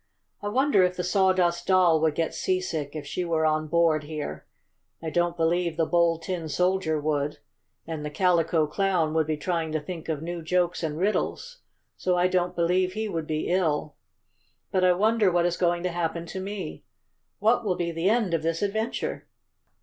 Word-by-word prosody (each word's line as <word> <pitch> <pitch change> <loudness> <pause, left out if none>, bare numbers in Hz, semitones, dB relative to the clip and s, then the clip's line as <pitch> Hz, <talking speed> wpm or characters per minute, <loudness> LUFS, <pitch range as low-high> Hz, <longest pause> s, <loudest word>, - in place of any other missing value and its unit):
"I 205 - -4
wonder 255 -1 +3
if 180 0 +2
the 180 - -1
Sawdust 185 -2 +2
Doll 180 -4 +4
would 160 -2 +2
get 165 0 -1
seasick 165 -6 -2
if 150 -2 -5
she 145 +5 -3
were 165 -2 0
on 155 0 +1
board 165 -1 +3
here. 150 -1 -6 0.5
I 160 -1 -5
don't 175 +2 0
believe 170 0 +1
the 165 - +2
Bold 170 -1 +2
Tin 170 -3 -4
Soldier 180 0 +1
would, 150 -1 -1 0.5
and 160 -2 -5
the 150 - -3
Calico 165 -1 +2
Clown 170 -1 0
would 160 -1 +1
be 155 -1 -1
trying 165 -1 -2
to 155 - +1
think 165 +2 -7
of 155 -1 -2
new 170 0 -4
jokes 180 +1 0
and 155 -2 -3
riddles, 215 - -1 0.4
so 180 -1 0
I 175 +1 +4
don't 180 -1 0
believe 180 +2 +1
he 220 +1 -2
would 165 -6 -3
be 155 0 -2
ill. 155 -5 0 0.8
But 185 -1 +1
I 180 0 +6
wonder 215 +1 +3
what 175 0 +2
is 175 0 +1
going 175 -1 +1
to 180 - 0
happen 170 0 -2
to 190 +3 -6
me? 190 - -6 0.5
What 225 +3 +2
will 190 -4 0
be 170 -1 -2
the 165 +3 0
end 220 -5 +1
of 165 - +1
this 165 +3 -1
adventure?" 220 +3 -2
175 Hz, 190 wpm, -26 LUFS, 160-185 Hz, 0.8 s, I